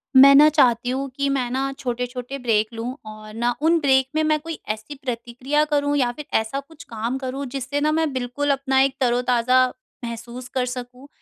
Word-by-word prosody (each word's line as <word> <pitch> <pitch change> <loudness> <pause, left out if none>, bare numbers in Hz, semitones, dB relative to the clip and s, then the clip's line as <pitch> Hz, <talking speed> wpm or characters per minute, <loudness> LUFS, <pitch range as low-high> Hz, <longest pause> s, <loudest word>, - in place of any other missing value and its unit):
मैं 275 +1 +9
ना 295 +2 +8
चाहती 250 -5 +3
हूँ 270 +2 -2
कि 280 0 0
मैं 260 -3 0
ना 270 +2 -1
छोटे-छोटे 250 +1 -4
ब्रेक 220 -4 +1
लूँ 235 +3 -4
और 215 0 -11
ना 240 +2 0
उन 330 +2 +3
ब्रेक 265 -3 +3
में 315 - +2
मैं 310 0 +2
कोई 325 +1 -7
ऐसी 220 +7 -4
प्रतिक्रिया 250 +4 -1
करूँ 290 -1 0
या 250 -3 +2
फिर 295 +4 -9
ऐसा 220 +5 -3
कुछ 290 +2 -13
काम 230 +3 -3
करूँ 270 +1 -4
जिससे 275 +1 -2
ना 305 +1 +2
मैं 315 -1 +1
बिल्कुल 260 +3 -2
अपना 270 -1 +1
एक 270 0 +2
तरो-ताज़ा 250 +1 +3 0.4
महसूस 235 +2 -7
कर 255 -1 0
सकूँ, 250 +1 -7
260 Hz, 195 wpm, -22 LUFS, 245-280 Hz, 0.4 s, मैं